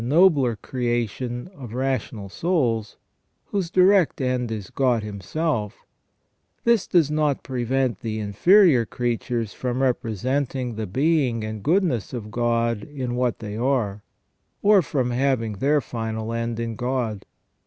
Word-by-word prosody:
55 120 - -3
nobler 145 -7 +4
creation 120 - -3
of 120 -6 -8
rational 130 -6 -2
souls, 120 - -1 0.5
whose 190 -4 -2
direct 185 -1 +4
end 125 -3 -1
is 105 -4 -5
God 125 -5 +1
Him 105 -2 -6
self, 125 - -2 0.8
this 235 -4 +3
does 160 -5 +3
not 150 -2 +1
prevent 130 -2 -1
the 110 -2 -4
inferior 130 - +5
creatures 120 -1 -2
from 125 0 -3
representing 130 +1 -1
the 110 -1 -4
being 130 - +1
and 110 -1 -5
goodness 160 - +1
of 110 -4 -6
God 115 -1 0
in 130 -4 -5
what 125 -1 0
they 105 -2 -6
are; 115 -4 0 0.6
or 205 -1 +6
from 130 -6 -1
having 120 -4 0
their 145 +4 +3
final 115 -1 -4
end 115 0 -2
in 115 -1 -3
God. 120 -4 -2
125 Hz, 135 wpm, -24 LUFS, 115-140 Hz, 0.8 s, or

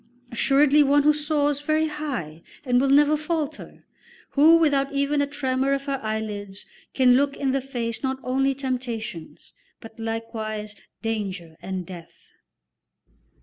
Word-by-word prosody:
Assuredly 280 +5 +4
one 285 0 +4
who 300 +1 +5
soars 295 -1 0
very 310 +1 +1
high 265 - -5 0.2
and 250 -1 +3
will 275 - +2
never 295 +2 +5
falter, 305 0 -4 0.5
who 315 +4 +6
without 285 -4 +2
even 280 +1 +1
a 285 - 0
tremor 270 -1 0
of 275 0 -2
her 275 -1 -2
eyelids 210 -2 -4 0.3
can 255 -2 +5
look 280 +1 +1
in 275 -2 0
the 270 0 0
face 240 -4 -4
not 265 -1 -1
only 270 +1 +1
temptations, 245 - -5 0.3
but 225 0 -13
likewise 225 -2 -4 0.3
danger 195 -7 -4
and 185 -1 -4
death." 175 -2 -13
270 Hz, 140 wpm, -24 LUFS, 225-285 Hz, 0.5 s, who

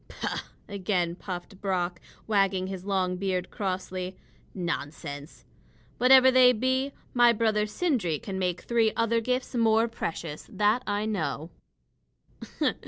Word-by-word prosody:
"Pooh!" - - -3 0.3
again 185 -3 -1
puffed 180 +1 -7
Brock, 180 -3 -1 0.2
wagging 195 -3 +2
his 190 -1 -6
long 185 -2 0
beard 185 -1 -2
crossly. 185 -1 -3 0.4
"Nonsense! 155 -4 -5 0.5
Whatever 260 +1 +7
they 255 -1 +7
be, 260 +4 0 0.2
my 240 -1 +6
brother 215 -2 +1
Sindri 210 - 0
can 190 +4 -5
make 180 -1 -1
three 230 -2 +2
other 230 0 +2
gifts 255 +3 -2
more 225 -1 +3
precious; 165 -8 -5
that 215 +4 +2
I 205 +1 0
know." 165 -6 -2
200 Hz, 120 wpm, -27 LUFS, 180-230 Hz, 0.5 s, Whatever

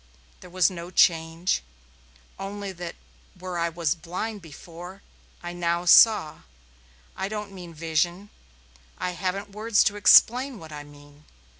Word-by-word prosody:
There 180 - -13
was 185 -1 +2
no 170 -1 -8
change, 165 0 +2 0.8
only 200 0 -5
that 175 -2 -7 0.4
where 180 -1 -5
I 170 0 0
was 165 -2 -1
blind 185 +6 -6
before 175 +4 -12 0.4
I 175 0 -6
now 175 0 -1
saw. 175 -4 +6 0.8
I 190 +1 -3
don't 210 -1 -5
mean 180 -3 -10
vision. 170 +5 -2 0.7
I 180 - -3
haven't 190 +3 -4
words 215 +1 +2
to 205 -1 0
explain 250 +5 +5
what 160 -4 -12
I 150 -1 -7
mean. 145 0 -18
175 Hz, 135 wpm, -25 LUFS, 165-200 Hz, 0.8 s, saw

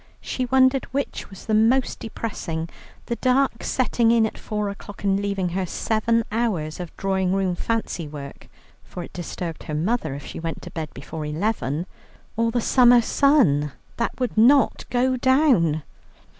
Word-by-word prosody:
She 255 -1 -3
wondered 260 +1 +4
which 280 +2 -4
was 195 -2 -12
the 220 - -1
most 230 +5 +3
depressing, 170 -8 -4 0.4
the 235 - -3
dark 255 -2 +1
setting 240 -2 +1
in 230 -1 +4
at 220 - -4
four 210 -1 -3
o'clock 200 0 -9
and 195 -1 +2
leaving 200 -3 -1
her 185 +1 -2
seven 230 +4 +1
hours 195 -10 -1
of 175 -2 -7
drawing 190 -1 0
room 190 -2 +1
fancy 180 -4 -2
work 145 -2 -9 0.4
(for 180 - -7
it - - -12
disturbed 175 -1 -5
her 150 - -4
mother 165 - -1
if 140 - -8
she - - -7
went 165 0 -5
to - - -8
bed 160 -2 -4
before 155 +3 -6
eleven), 155 -1 -1 0.5
or 230 +1 +1
the 240 +1 0
summer 245 0 +6
sun 225 - +3 0.2
that 235 - -2
would 250 -2 -1
not 255 +6 +4
go 255 +1 +1
down. 245 - +3
210 Hz, 165 wpm, -23 LUFS, 170-245 Hz, 0.5 s, summer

